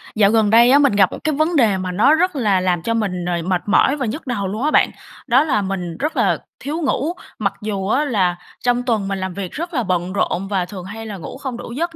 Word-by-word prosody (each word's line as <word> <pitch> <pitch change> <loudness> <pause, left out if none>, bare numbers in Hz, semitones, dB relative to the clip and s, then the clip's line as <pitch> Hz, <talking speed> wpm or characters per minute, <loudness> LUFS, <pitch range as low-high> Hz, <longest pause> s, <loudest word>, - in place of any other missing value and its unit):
Dạo 205 -1 +4
gần 220 -2 +3
đây 235 +3 +6
á, 285 - +6
mình 280 -6 +4
gặp 195 -2 +4
một - - -6
cái 310 -2 0
vấn 315 +3 +1
đề 220 -8 +3
mà 185 -1 -3
nó 230 +11 +4
rất 360 0 +1
là 210 -8 +2
làm 180 -2 0
cho 230 - 0
mình, 190 -6 -2
ờ, 175 - -1
mệt 185 -1 0
mỏi 270 +6 +3
và 270 - -2
nhức 265 +7 -5
đầu 205 -6 -2
luôn 215 +6 -4
á 305 - +2
bạn. - - +4 0.4
Đó 255 +4 +5
là 275 -9 +1
mình 185 -4 -4
rất 305 +4 -2
là - - +2 0.2
thiếu 305 +5 -4
ngủ. 300 +2 0 0.3
Mặc 200 -3 0
dù 200 -2 -3
á 280 +8 +2
là 190 -10 +1 0.3
trong 245 0 +2
tuần 225 -6 0
mình 195 -1 -2
làm 190 -1 -4
việc 190 -1 -5
rất 340 +3 -5
là 250 -5 0
bận 180 -1 -1
rộn 195 -1 -1
và 190 -3 0
thường 185 -1 -9
hay 220 +3 -7
là 210 -3 -6
ngủ 170 - -8
không 265 -3 -5
đủ 240 - -8
giấc, 330 +7 -3
215 Hz, 270 wpm, -19 LUFS, 190-270 Hz, 0.4 s, đây